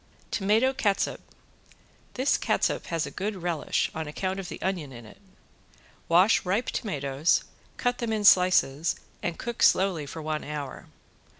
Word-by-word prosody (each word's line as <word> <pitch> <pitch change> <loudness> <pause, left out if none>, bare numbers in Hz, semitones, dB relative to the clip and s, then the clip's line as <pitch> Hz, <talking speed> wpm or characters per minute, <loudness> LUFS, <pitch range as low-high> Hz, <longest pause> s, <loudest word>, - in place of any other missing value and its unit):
~TOMATO 220 +6 +2
CATSUP~ 205 -6 0 0.9
This 260 +2 +2
catsup - - 0
has 165 -1 -1
a - - -7
good 205 +2 -3
relish 175 -4 -1
on 160 -1 -4
account 185 +5 -3
of 185 -2 -6
the - - -7
onion 175 -7 -3
in 120 -2 -11
it. 110 - -15 0.9
Wash 180 +6 +5
ripe 200 +6 0
tomatoes, 145 - 0 0.3
cut 245 0 0
them 235 -2 -2
in 215 -1 -1
slices 175 -5 +4 0.3
and 175 -1 -3
cook 235 -1 -5
slowly 185 -6 +3
for 160 - -7
one 155 0 -2
hour. 145 -3 -6
180 Hz, 145 wpm, -27 LUFS, 155-205 Hz, 0.9 s, Wash